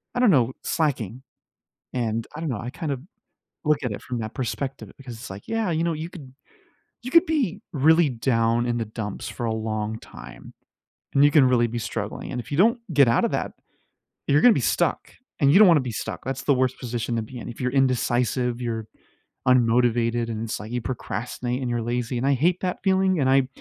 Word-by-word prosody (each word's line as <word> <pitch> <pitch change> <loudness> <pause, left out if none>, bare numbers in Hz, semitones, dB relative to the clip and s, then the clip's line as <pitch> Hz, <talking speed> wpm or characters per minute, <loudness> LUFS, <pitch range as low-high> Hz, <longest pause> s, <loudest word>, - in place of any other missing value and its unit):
I - - 0
don't 245 -4 +5
know, 130 -5 +3
slacking, 130 - -1 0.7
and 115 -2 -2
I - - -6
don't 165 - -3
know, 115 -5 -3
I 120 - -5
kind 145 +2 -4
of 135 - -4 0.7
look 150 -1 +2
at 125 - -1
it 100 - -6
from 125 -2 -4
that 110 0 -5
perspective 130 +2 -4
because 130 -4 -9
it's 115 - -9
like, 95 +1 -9
"Yeah, 225 -4 0
you 160 0 0
know, 170 -1 0
you 160 +2 -5
could 145 -8 -12 0.7
you 250 - -5
could 335 +2 +6
be 250 - 0
really 160 +3 +4
down 115 -2 +1
in 120 -1 0
the 115 - -1
dumps 105 -1 -5
for 120 - -6
a 115 - 0
long 110 0 -3
time - - -12 0.6
and 140 - +6
you 145 - +6
can 145 -3 +6
really 120 -2 +3
be 120 +1 -4
struggling 110 -2 -5
and 125 - -2
if - - -15
you 145 - -1
don't 230 +7 +4
get 140 -3 +6
out 115 - +3
of - - -1
that, - - -2 0.7
you're 145 +1 +4
gonna 245 - +7
be - - 0
stuck," - - 0 0.3
and 140 0 +5
you 190 - +7
don't 210 -2 +8
wanna 165 -4 +6
be 130 -2 -4
stuck. - - -5
That's 135 +1 -3
the 140 - +4
worst 130 0 0
position 120 -1 -3
to 115 - 0
be 125 +3 -9
in. - - -7
If 115 - -9
you're 125 -1 -1
indecisive, 125 -2 +1
you're 115 -2 -3 0.6
unmotivated, 120 -1 +3
and 110 -1 -3
it's 115 - -4
like 105 +2 -8
you 125 - -1
procrastinate, 125 +1 -4
and 125 - -2
you're 120 -1 -1
lazy 120 +1 -2
and 125 +3 0
I 140 - +4
hate 170 +7 +2
that 180 -1 -2
feeling, 190 -2 +2
and 130 -2 +2
I 135 -1 +4
125 Hz, 225 wpm, -24 LUFS, 115-150 Hz, 0.7 s, don't